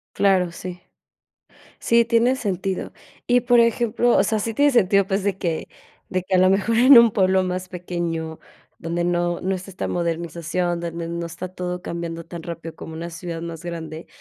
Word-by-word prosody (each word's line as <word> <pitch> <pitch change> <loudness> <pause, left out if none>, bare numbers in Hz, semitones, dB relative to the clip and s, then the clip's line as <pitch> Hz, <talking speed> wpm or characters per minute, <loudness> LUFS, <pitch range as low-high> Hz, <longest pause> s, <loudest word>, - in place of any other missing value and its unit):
Claro, 190 -3 +3
sí. 180 +1 -8 1.0
Sí, 235 0 +3
tiene 235 +2 +3
sentido. 195 -5 -3 0.3
Y, 245 0 +4
por 240 -1 +4
ejemplo, 235 0 +2
o - - +5
sea, 220 +1 0
sí 225 +2 -3
tiene 290 +4 +4
sentido, 200 -6 +3
pues, 195 0 -1
de 200 -2 0
que 165 -4 -2 0.4
de 185 -1 -1
que, 185 - -2
a - - +5
lo 185 +1 +5
mejor 200 +4 +1
en 255 +1 +9
un 235 -1 +7
pueblo 190 -2 +3
más 185 0 -3
pequeño, 170 -3 -4 0.4
donde 170 +1 -2
no 175 0 0
no 190 +1 -1
está 185 +1 -7
esta 190 - -4
modernización, 170 +1 -2
donde 170 0 -5
no 170 0 -3
está 175 +2 -6
todo 180 0 -5
cambiando 170 -1 -5
tan 170 0 -8
rápido, 165 -1 -7
como 160 - -9
una 170 +2 -6
ciudad 165 0 -6
más 165 -1 -7
grande, 165 -2 -6
180 Hz, 185 wpm, -22 LUFS, 170-200 Hz, 1.0 s, en